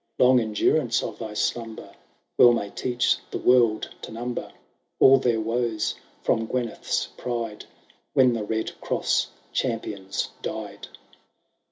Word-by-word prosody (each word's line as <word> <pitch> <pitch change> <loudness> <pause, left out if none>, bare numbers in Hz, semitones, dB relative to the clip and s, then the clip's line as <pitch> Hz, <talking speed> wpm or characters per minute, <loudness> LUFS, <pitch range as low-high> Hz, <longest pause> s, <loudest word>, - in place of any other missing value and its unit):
Long 125 0 +6
endurance 110 -3 +1
of - - -6
thy 105 -1 -6
slumber 115 0 -3 0.5
WeU 120 -1 +8
may 100 -3 -3
teach 125 -1 +1
the - - -3
world 120 -4 +3
to - - -8
number 120 +2 -5 0.5
All 135 0 +7
their 120 -3 +1
woes 115 -1 -1 0.3
from 115 0 +1
Gyneth'b 120 -3 -2
pride, 115 -3 -4 0.5
When 130 -2 +5
the 115 - -2
Bed 110 +1 -2
Cross - - +1 0.3
champions 105 -6 -2
died. - - -6
115 Hz, 125 wpm, -25 LUFS, 110-125 Hz, 0.5 s, WeU